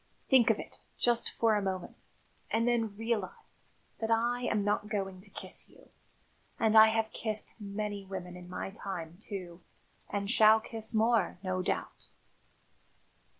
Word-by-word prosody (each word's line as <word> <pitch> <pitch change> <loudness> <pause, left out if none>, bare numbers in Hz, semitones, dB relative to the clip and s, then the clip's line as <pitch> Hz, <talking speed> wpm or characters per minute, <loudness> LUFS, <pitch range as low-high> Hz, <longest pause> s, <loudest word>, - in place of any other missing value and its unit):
Think 255 -4 +6
of 220 - +4
it, - - -9 0.2
just 240 -1 +2
for 225 -1 +3
a 210 - +2
moment, 190 -2 -5 0.4
and 230 +1 +1
then 225 -4 +1
realise 225 -4 -4 0.3
that 225 - -2
I 235 +2 +2
am 210 -4 +1
not 210 +1 0
going 195 -3 -3
to 200 - -16
kiss - - -2
you. - - -20 0.7
And 220 -1 +3
I 220 0 +10
have 220 0 0
kissed 215 -1 -1
many 205 0 -4
women 185 -2 -7
in 180 0 -11
my 185 +1 -4
time, 180 -5 -6
too, 180 -5 -7 0.5
and 200 0 -2
shall 220 -1 +7
kiss 220 0 -2
more, 220 -5 +2
no 185 -1 -1
doubt." 185 - -3
210 Hz, 150 wpm, -31 LUFS, 190-225 Hz, 0.7 s, I